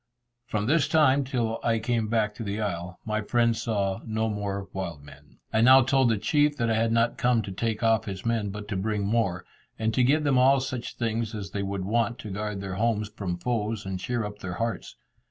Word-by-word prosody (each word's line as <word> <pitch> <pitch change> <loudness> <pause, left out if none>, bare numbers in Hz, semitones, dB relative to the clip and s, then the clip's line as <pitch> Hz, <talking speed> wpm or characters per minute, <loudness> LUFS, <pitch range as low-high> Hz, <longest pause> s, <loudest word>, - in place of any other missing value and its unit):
From 105 -1 -1
this 150 +5 +3
time 145 -3 +4
till 120 -4 -1
I 115 -1 +2
came 115 0 0
back 110 -1 +1
to 110 - -7
the 100 0 -3
isle 90 -3 -3
my 110 -1 -1
friends 115 +1 +1
saw 100 -5 -1
no 110 0 -1
more 100 -2 -3
wild 85 -6 -5
men. 70 - -16 0.2
I 110 - +3
now 130 +2 +8
told 130 -1 +3
the 110 - +2
chief 145 +7 +2
that 115 -1 +1
I - - +3
had 115 +1 +1
not 115 +1 +1
come 120 -2 +2
to 100 - -6
take 110 +3 -2
off 115 0 +3
his 95 0 -6
men, 115 -3 0
but 105 +1 -7
to - - -2
bring 100 +1 -1
more, 100 -5 0 0.3
and 110 0 0
to 130 - +2
give 150 +5 +3
them 140 -3 +3
all 135 +2 +5
such 130 -2 -4
things 115 -1 -2
as 100 -4 -6
they 100 - -2
would 100 -1 -3
want 115 +3 0
to 105 - -8
guard 105 0 -3
their 95 -1 -5
homes 110 -1 0
from 100 -5 -4
foes, 110 +1 -2
and 95 -1 -3
cheer 120 +3 -2
up 105 0 -7
their 90 -2 -5
hearts. 115 -1 -3
110 Hz, 225 wpm, -27 LUFS, 100-120 Hz, 0.3 s, now